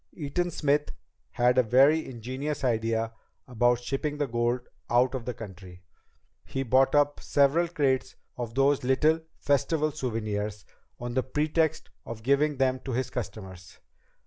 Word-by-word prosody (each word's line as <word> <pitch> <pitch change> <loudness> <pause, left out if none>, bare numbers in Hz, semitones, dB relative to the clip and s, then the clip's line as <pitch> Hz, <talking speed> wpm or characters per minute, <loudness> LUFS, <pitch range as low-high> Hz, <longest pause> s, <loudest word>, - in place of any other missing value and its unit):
Eaton 175 +3 -2
Smith 150 -2 0 0.4
had 125 +1 +3
a - - +8
very 135 +7 +4
ingenious 130 +5 -5
idea 115 -2 0 0.3
about 120 0 +2
shipping 140 +4 -3
the 145 - 0
gold 120 0 0 0.3
out 125 +2 +3
of 130 -3 -4
the 125 - -3
country. 95 -4 -11 0.6
He 135 - -3
bought 135 +3 +3
up 145 0 +3
several 145 +5 +2
crates 135 -6 0 0.2
of 120 -2 -5
those 135 0 +3
little 150 +5 +3 0.2
Festival 150 +2 +1
souvenirs, 110 -6 -3 0.3
on 120 0 -5
the 130 - +2
pretext 155 +3 0
of 110 -1 -8
giving 140 +3 +2
them 130 -1 +1
to 130 0 -5
his 130 +1 -2
customers. 95 -7 -7
130 Hz, 145 wpm, -27 LUFS, 115-145 Hz, 0.6 s, a